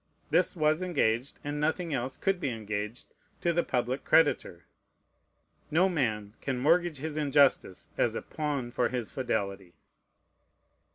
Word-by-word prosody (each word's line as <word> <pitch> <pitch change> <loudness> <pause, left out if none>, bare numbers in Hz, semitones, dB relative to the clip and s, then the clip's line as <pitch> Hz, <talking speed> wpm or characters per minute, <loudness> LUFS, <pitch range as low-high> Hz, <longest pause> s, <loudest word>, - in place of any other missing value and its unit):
This - - +3
was 155 0 +2
engaged, 140 -8 0
and 145 0 -3
nothing 160 +2 0
else 130 0 -2
could 195 -2 0
be 145 -6 -1
engaged, 105 0 -5 0.3
to 170 - +2
the 170 +1 +2
public 125 +2 -1
creditor. 145 - +2 1.1
No 170 +5 +4
man 110 - -1
can 135 -2 -2
mortgage 165 +4 +2
his 150 +2 -5
injustice 140 -9 +2
as - - +2
a - - -3
pawn 145 -5 -3
for 120 0 +1
his 125 -4 -3
fidelity. 100 -8 -3
140 Hz, 135 wpm, -29 LUFS, 120-155 Hz, 1.1 s, No